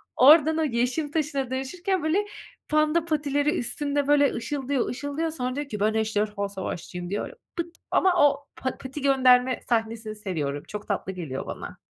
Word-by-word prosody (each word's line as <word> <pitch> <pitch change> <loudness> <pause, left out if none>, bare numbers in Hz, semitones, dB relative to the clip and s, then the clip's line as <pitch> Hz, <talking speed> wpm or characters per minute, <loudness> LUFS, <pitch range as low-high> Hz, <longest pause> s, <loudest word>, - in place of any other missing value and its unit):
Oradan 310 +4 +7
o 320 - +2
yeşim 255 +3 0
taşına 280 -5 -1
dönüşürken 345 +8 -2
böyle 360 +7 +1 0.4
panda 305 +2 +2
patileri 295 0 +1
üstünde 285 +3 -1
böyle 285 -1 +4
ışıldıyor, 270 +2 -2
ışıldıyor 285 +5 -2
sonra 255 -4 -3
diyor 290 -1 -4
ki 210 - -4
ben 215 +2 +2
ejderha 210 -2 -1
savaşçıyım 180 -2 -5
diyor, 205 - -3 0.2
pıt 340 0 -4 0.2
ama 355 -5 +4
o 285 0 -2
pa 260 - -3
pati 265 +2 -7
gönderme 255 -2 +4
sahnesini 225 -2 -1
seviyorum. 155 -9 -3
Çok 210 0 -7
tatlı 195 -2 -2
geliyor 160 -8 -5
bana. - - -7
270 Hz, 155 wpm, -26 LUFS, 220-300 Hz, 0.4 s, Oradan